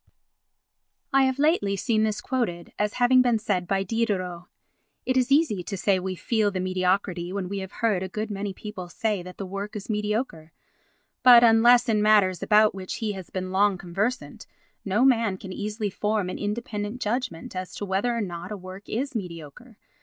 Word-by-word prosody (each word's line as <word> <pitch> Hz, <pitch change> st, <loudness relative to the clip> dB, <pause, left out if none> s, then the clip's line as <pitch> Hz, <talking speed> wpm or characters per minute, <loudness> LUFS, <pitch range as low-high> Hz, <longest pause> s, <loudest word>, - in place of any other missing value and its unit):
I 270 Hz, 0 st, +5 dB
have 260 Hz, 0 st, 0 dB
lately 285 Hz, -, +2 dB
seen 220 Hz, +2 st, 0 dB
this 215 Hz, -1 st, 0 dB
quoted 215 Hz, -11 st, -3 dB
as 210 Hz, 0 st, 0 dB
having 255 Hz, +1 st, +5 dB
been 245 Hz, -2 st, +3 dB
said 195 Hz, -4 st, -1 dB
by 195 Hz, +1 st, +1 dB
Diderot. 190 Hz, -5 st, -2 dB, 0.6 s
It 260 Hz, -, 0 dB
is 260 Hz, +1 st, +2 dB
easy 280 Hz, -, +3 dB
to 195 Hz, +3 st, -5 dB
say 190 Hz, 0 st, +2 dB
we 185 Hz, 0 st, -4 dB
feel 215 Hz, +2 st, +1 dB
the 190 Hz, -2 st, -4 dB
mediocrity 185 Hz, -1 st, 0 dB
when 195 Hz, -1 st, -3 dB
we 200 Hz, +1 st, -4 dB
have 190 Hz, 0 st, -7 dB
heard 205 Hz, -5 st, +2 dB
a 190 Hz, -, -4 dB
good 215 Hz, +3 st, -4 dB
many 200 Hz, 0 st, -3 dB
people 190 Hz, -2 st, -8 dB
say 210 Hz, +1 st, -1 dB
that 180 Hz, +1 st, -10 dB
the 195 Hz, -, -5 dB
work 200 Hz, +3 st, -6 dB
is 210 Hz, +1 st, -5 dB
mediocre, 210 Hz, -6 st, -3 dB, 0.7 s
but, 245 Hz, -2 st, +8 dB
unless 235 Hz, +2 st, +6 dB
in 215 Hz, -2 st, +2 dB
matters 205 Hz, -4 st, +4 dB
about 215 Hz, 0 st, +4 dB
which 190 Hz, -1 st, -6 dB
he 220 Hz, -2 st, -2 dB
has 190 Hz, -3 st, -8 dB
been 185 Hz, 0 st, -4 dB
long 200 Hz, 0 st, +3 dB
conversant, 195 Hz, +8 st, -3 dB, 0.4 s
no 210 Hz, +6 st, +2 dB
man 230 Hz, -7 st, +3 dB
can 190 Hz, 0 st, -8 dB
easily 210 Hz, +1 st, -3 dB
form 210 Hz, -2 st, -1 dB
an -, -, -6 dB
independent 210 Hz, +1 st, -4 dB
judgment 225 Hz, -7 st, -3 dB
as 185 Hz, 0 st, -5 dB
to 205 Hz, -, -4 dB
whether 205 Hz, +5 st, 0 dB
or -, -, -1 dB
not 175 Hz, -1 st, -5 dB
a 210 Hz, -, -4 dB
work 185 Hz, +2 st, -11 dB
is 265 Hz, +5 st, -2 dB
mediocre. 180 Hz, -, -8 dB
205 Hz, 190 wpm, -25 LUFS, 185-225 Hz, 0.7 s, but